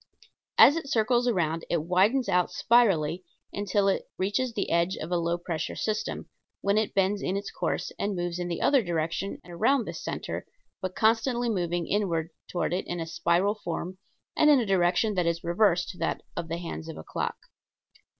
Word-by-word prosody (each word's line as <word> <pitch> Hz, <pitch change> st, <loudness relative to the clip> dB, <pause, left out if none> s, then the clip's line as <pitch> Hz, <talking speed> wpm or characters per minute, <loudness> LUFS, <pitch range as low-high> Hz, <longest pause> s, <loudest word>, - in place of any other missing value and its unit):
As 290 Hz, -, +8 dB
it 320 Hz, -4 st, -5 dB
circles 240 Hz, +1 st, +2 dB
around 165 Hz, -7 st, 0 dB
it 170 Hz, -3 st, 0 dB
widens 200 Hz, +10 st, +2 dB
out 180 Hz, 0 st, +2 dB
spirally 185 Hz, -8 st, +3 dB, 0.3 s
until 205 Hz, 0 st, +1 dB
it 195 Hz, -, 0 dB
reaches 210 Hz, +7 st, 0 dB
the 205 Hz, -3 st, -3 dB
edge 170 Hz, +2 st, +2 dB
of 160 Hz, -, -6 dB
a -, -, +2 dB
low 170 Hz, 0 st, 0 dB
pressure 170 Hz, -2 st, -4 dB
system, 215 Hz, -1 st, -2 dB, 0.3 s
when 200 Hz, 0 st, +2 dB
it 220 Hz, -, -2 dB
bends 195 Hz, +1 st, +2 dB
in 190 Hz, -, -1 dB
its 200 Hz, 0 st, -5 dB
course -, -, -2 dB
and 200 Hz, 0 st, -1 dB
moves 175 Hz, 0 st, -3 dB
in 175 Hz, -, -2 dB
the 170 Hz, -1 st, -3 dB
other 275 Hz, -3 st, +5 dB
direction 170 Hz, +1 st, -2 dB
around 220 Hz, +9 st, +1 dB
this -, -, -6 dB
center, -, -, -4 dB, 0.3 s
but 185 Hz, 0 st, -4 dB
constantly 235 Hz, +2 st, +2 dB
moving 175 Hz, -4 st, -1 dB
inward 170 Hz, -6 st, 0 dB, 0.2 s
toward 175 Hz, -1 st, -1 dB
it 185 Hz, -, -2 dB
in 175 Hz, -, -3 dB
a 165 Hz, -, -2 dB
spiral 170 Hz, +4 st, +1 dB
form 185 Hz, -2 st, -5 dB, 0.4 s
and 305 Hz, -, +5 dB
in 290 Hz, -3 st, +7 dB
a 235 Hz, -, 0 dB
direction 190 Hz, +2 st, +2 dB
that 180 Hz, -3 st, 0 dB
is 170 Hz, 0 st, -1 dB
reverse 180 Hz, +1 st, +2 dB
to 180 Hz, -, -16 dB
that -, -, -1 dB
of 170 Hz, -1 st, -4 dB
the 165 Hz, +1 st, -3 dB
hands 165 Hz, -2 st, -6 dB
of 160 Hz, -, -7 dB
a -, -, -8 dB
clock. -, -, -3 dB
185 Hz, 190 wpm, -27 LUFS, 170-215 Hz, 0.4 s, As